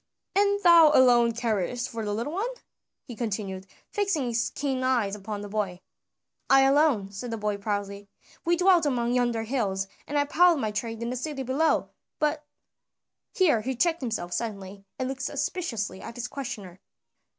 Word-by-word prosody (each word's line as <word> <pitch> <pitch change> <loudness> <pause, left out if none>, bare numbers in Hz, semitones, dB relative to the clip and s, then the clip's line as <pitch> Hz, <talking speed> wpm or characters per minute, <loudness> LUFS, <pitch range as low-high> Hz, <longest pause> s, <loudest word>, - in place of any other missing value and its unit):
"And 405 0 +3
thou 340 -3 +8
alone 240 -2 +6
carest 230 +1 -1
for 230 -2 -5
the 205 - -2
little 235 +8 -3
one?" 415 +7 -1 0.5
he 245 -5 -9
continued, 195 -4 -4 0.2
fixing 390 -9 0
his 235 -1 0
keen 270 -2 -2
eyes 240 -6 +1
upon 210 0 -5
the 205 - -6
boy. 200 -3 -2 0.7
"I 270 0 +7
alone," 270 -7 +3
said 220 +5 -6
the 225 - -3
boy 210 -1 -2
proudly. 200 -1 -4 0.3
"We 345 +1 +2
dwelt 360 -3 +4
among 240 -3 0
yonder 240 -2 +1
hills, 205 -6 -1 0.2
and 290 - -2
I 285 - +3
plied 345 +3 +4
my 220 -6 -1
trade 225 +2 -4
in 235 - -2
the - - -3
city 270 +1 -4
below, 275 +6 +1 0.3
but 300 -1 0 0.5
" - - -60
here 305 - +4
he 260 +4 -3
checked 335 +5 +1
himself 215 -8 -3
suddenly, 200 -3 -5
and 260 - -2
looked 265 0 -5
suspiciously 265 - -3
at 230 - -8
his 245 0 -4
questioner. 205 -10 -7
240 Hz, 175 wpm, -27 LUFS, 210-290 Hz, 0.7 s, thou